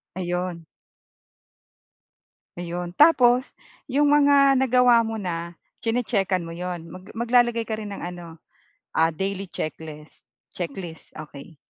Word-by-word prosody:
Ayun. 180 -2 -3 1.9
Ayun 175 0 -5
tapos, 255 -5 +5 0.4
'yong 290 +3 +3
mga 285 -1 +5
nagawa 250 -2 +4
mo 225 0 -4
na 170 -3 -5 0.2
chine-chekan 225 -5 0
mo 165 -1 -7
'yon? 175 -1 -5
Mag 185 +2 -11
maglalagay 235 0 +2
ka 220 - -2
rin 210 -1 -7
ng 200 - -6
ano, 175 -2 -8 0.6
ah, 165 +1 +3
daily 195 +4 -3
checklist, 155 -3 -8 0.2
checklist. 175 -2 -7
Okey. 150 +1 -11
185 Hz, 115 wpm, -24 LUFS, 170-240 Hz, 1.9 s, tapos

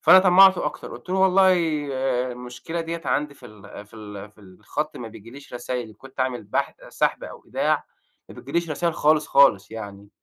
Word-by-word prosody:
فأنا - - +8
طمّعته 190 0 +6
أكتر، - - -6
قُلت 120 +9 -13
له: 190 - +1
"والله 190 0 +5 0.8
المشكلة 125 +7 -6
دِيّة 165 0 -5
عندي 150 -1 -1
في 130 -3 -14
ال 105 -1 -12
في 105 - -19
ال 105 -1 -9
في 105 - -23
الخط 105 +10 -6
ما 115 - -7
بييجيليش 115 +6 -13
رسايل 120 -1 -4
إن 110 - -15
كنت 135 +2 -11
اعمل 125 -3 -1
بح 100 - -2
سحب - - -1
أو - - -10
إيداع، - - 0 0.4
ما - - -12
بتيجيليش 170 -2 -3
رسايل 170 +2 -1
خالص، 155 0 +3
خالص 110 -7 +4
يعني. 100 -2 -9
130 Hz, 180 wpm, -23 LUFS, 105-165 Hz, 0.8 s, فأنا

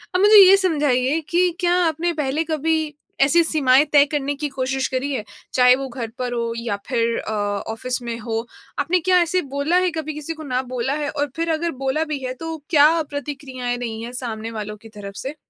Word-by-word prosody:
अब - - +3
मुझे 420 +1 +8
ये 380 +1 +8
समझाइए 295 -6 +1
कि 355 +1 +3
क्या 350 -1 +2
आपने 325 +2 -1
पहले 300 0 -1
कभी 315 -1 -1 0.3
ऐसी 320 +5 +5
सीमाएँ 285 -3 +4
तय 285 -1 +7
करने 285 -1 -1
की 295 +1 -3
कोशिश 265 0 -2
करी 265 +2 -2
है, 250 - -2 0.3
चाहे 250 0 +6
वो 270 +1 -4
घर 240 -2 -5
पर 250 -1 -2
हो 235 -1 -2
या 230 -3 -3
फिर 230 -2 0
अ, - - -5
ऑफ़िस 220 +4 -3
में 235 -1 -4
हो, 225 0 -3 0.3
आपने 330 +6 +2
क्या 365 +2 +3
ऐसे 345 +2 +1
बोला 285 +5 0
है 365 -1 +2
कभी 310 0 -4
किसी 300 +2 -5
को 315 -1 -10
ना 255 -3 -1
बोला 255 +2 -1
है 290 - -2
और 290 0 -2
फिर 330 0 -2
अगर 335 +2 -1
बोला 270 +4 +1
भी 285 - -2
है, 255 0 -3
तो 325 +5 -6
क्या 315 +1 +5
प्रतिक्रियाएँ 275 -4 -4
रही 225 -2 -5
है 235 - -6
सामने 225 -1 -5
वालों 210 -1 -6
की 225 +2 -15
तरफ़ 200 -2 -9
से? 275 +3 -5
275 Hz, 215 wpm, -21 LUFS, 245-315 Hz, 0.3 s, मुझे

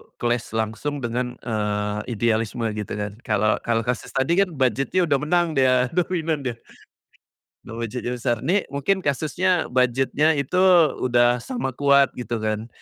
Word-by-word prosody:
clash 120 -1 -2
langsung 115 +6 -3
dengan, 125 +1 -2
eee, 105 -2 -2 0.2
idealisme 115 +1 0
gitu 105 -1 -5
kan. 105 -1 -3 0.2
Kalau 105 -1 +2
kalau 115 -1 -1
kasus 125 0 -4
tadi 165 +8 +2
kan, 185 -5 +1
budget-nya 135 - +1
udah 145 -5 +2
menang 175 +4 +1
dia, 130 -3 +2
dominan 165 -3 -1
dia, 120 - -3 1.1
kalo 115 -1 -8
budget-nya 125 +2 -4
besar. 120 0 0
Ini 195 +3 +1
mungkin 140 +8 0
kasusnya, 165 +4 0
budget-nya 130 +5 +2
itu 140 +6 -1 0.4
udah 120 0 +3
sama 240 - -4
kuat, 140 +1 +3
gitu 115 -2 -4
kan. 110 +1 -2
125 Hz, 145 wpm, -23 LUFS, 115-150 Hz, 1.1 s, udah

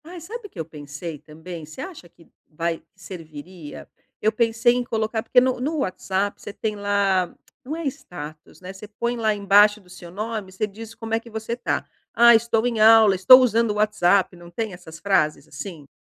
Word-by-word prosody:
Ai, 350 +2 -9
sabe 420 +7 -8
o - - -28
que - - -13
eu 160 - -3
pensei 150 +1 -8
também? 160 +3 -10
Você 155 +1 -13
acha 340 - -9
que 165 -1 -22 0.2
vai 165 +1 -3
serviria? 165 -3 -10 0.3
Eu 215 - +3
pensei 225 +1 +2
em 250 0 -1
colocar 220 -1 -2
porque 240 - +5
no 255 0 +1
no 300 +5 -2
WhatsApp 195 -2 -2
você - - -7
tem 215 +1 -3
lá 200 -3 +1 0.3
não 285 +4 -5
é 330 -1 -5
status, 155 - -8
né, 185 +1 -9
você 195 +2 -11
põe 235 +3 -3
lá 220 -2 +1
embaixo 205 +1 +5
do 190 - -23
seu 180 -1 -12
nome, 210 +1 -5
você 190 +3 -2
diz 220 +2 -10
como 225 -1 -7
é 225 - +2
que 235 - -15
você 220 +1 -4
tá: 245 - -2 0.3
"Ah, 235 +1 +7
estou 225 0 +1
em 235 -3 -1
aula, 220 -1 +7
estou 195 +8 +9
usando 230 -2 +2
o - - -1
WhatsApp", 200 -3 +2
não 175 0 -13
tem 215 +3 -4
essas 165 -2 -12
frases 180 -6 +1
assim? 150 0 -9
205 Hz, 200 wpm, -23 LUFS, 175-230 Hz, 0.3 s, estou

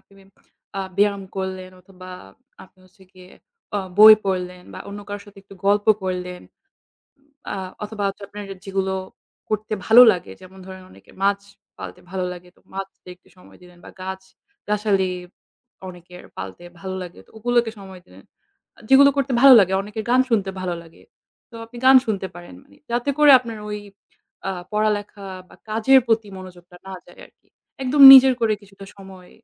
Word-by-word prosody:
আপনি - - -31 0.7
আ - - -2 0.2
ব্যায়াম 200 -1 +1
করলেন 185 -1 -5
অথবা 185 0 -15 0.6
আপনি 190 0 -27
হচ্ছে 190 +2 -24
গিয়ে 185 0 -17 0.5
আ - - 0 0.2
বই 215 +1 +10
পড়লেন 180 -1 -4
বা - - -9
অন্য 200 +1 -8
কারো 205 0 -6
সাথে 205 -1 -16
একটু 195 0 -16
গল্প 205 +1 +2 0.2
করলেন 180 -1 -5 1.1
আ - - -4 0.3
অথবা 210 0 -6
হচ্ছে 195 +1 -7
আপনার 205 +1 -9 0.2
যেগুলো 190 -1 -2 0.6
করতে 215 0 -3
ভালো 225 +2 +8
লাগে, 175 - -6
যেমন 190 +1 -15
ধরেন 190 0 -11
অনেকের - - -20
মাছ 200 0 +2 0.4
পালতে 95 -2 -9
ভালো 185 -1 -3
লাগে, 180 0 -14
তো - - -28
মাছদের 190 -2 -9 0.2
সময় - - -19
দিলেন 180 0 -18
বা - - -11
গাছ-গাছালি 195 - -4 0.8
অনেকের 180 0 -14
পালতে 95 - -9 0.2
ভালো 190 0 -6
লাগে 175 -1 -12
তো - - -28
ওগুলোকে 240 0 0
সময় 190 -2 -12
দিলেন। 95 +2 -18 0.5
আ - - -21
যেগুলো 280 +1 +6
করতে 275 -1 -1
ভালো 275 -1 +9
লাগে। 190 -1 +1
অনেকের 210 +2 -7
গান 250 +1 +4
শুনতে 200 -4 0
ভালো 180 -2 -3
লাগে, 165 -1 -19 0.5
তো - - -20
আপনি 235 +2 -15
গান 265 0 +8
শুনতে 200 -3 -3
পারেন, 175 - -12 0.4
যাতে 240 +4 -1
করে 295 -1 +6
আপনার 230 -3 -9
ওই 210 - -5 0.7
আ - - -1 0.2
পড়ালেখা 210 -1 -2 0.2
বা - - -18
কাজের 225 +5 +4
প্রতি 225 -2 0
মনোযোগটা 180 -1 -13
না 190 - -8
যায় 175 - -19
আরকি। - - -36 0.3
একদম 270 +2 +2
নিজের 265 0 +8
করে 225 -2 +1
কিছুটা 195 0 -15
সময় 190 -2 -14
195 Hz, 165 wpm, -21 LUFS, 185-215 Hz, 1.1 s, বই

